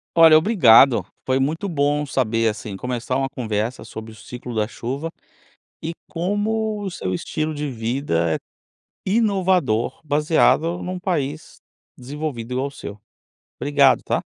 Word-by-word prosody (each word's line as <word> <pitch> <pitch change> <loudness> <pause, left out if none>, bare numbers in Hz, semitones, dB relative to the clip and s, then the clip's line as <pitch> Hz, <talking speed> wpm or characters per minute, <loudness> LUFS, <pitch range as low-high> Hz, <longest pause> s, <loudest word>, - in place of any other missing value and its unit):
Olha, 165 -2 +8
obrigado, 140 - +6 0.2
foi 130 0 +1
muito 160 +8 -1
bom 145 -2 +1
saber 115 -4 +1
assim 105 -1 -6
começar 125 +3 -3
uma 135 0 0
conversa 110 -1 -3
sobre 110 0 -8
o - - -13
ciclo 125 +3 -8
da 110 -2 0
chuva 135 +8 -4 0.7
e 165 - -4 0.2
como 210 +4 -1
o 195 - -3
seu 95 - -3
estilo 155 - -3
de 145 -1 -3
vida 115 - -1
é - - -1 0.7
inovador, 185 - +1
baseado 155 +3 +2
num 180 0 -4
país 155 -5 -3 0.4
desenvolvido 130 -2 -5
igual 130 +2 0
o - - -5
seu. 105 -6 -9 0.6
Obrigado, 140 -1 +4
tá. - - -1
140 Hz, 140 wpm, -22 LUFS, 115-165 Hz, 0.7 s, Olha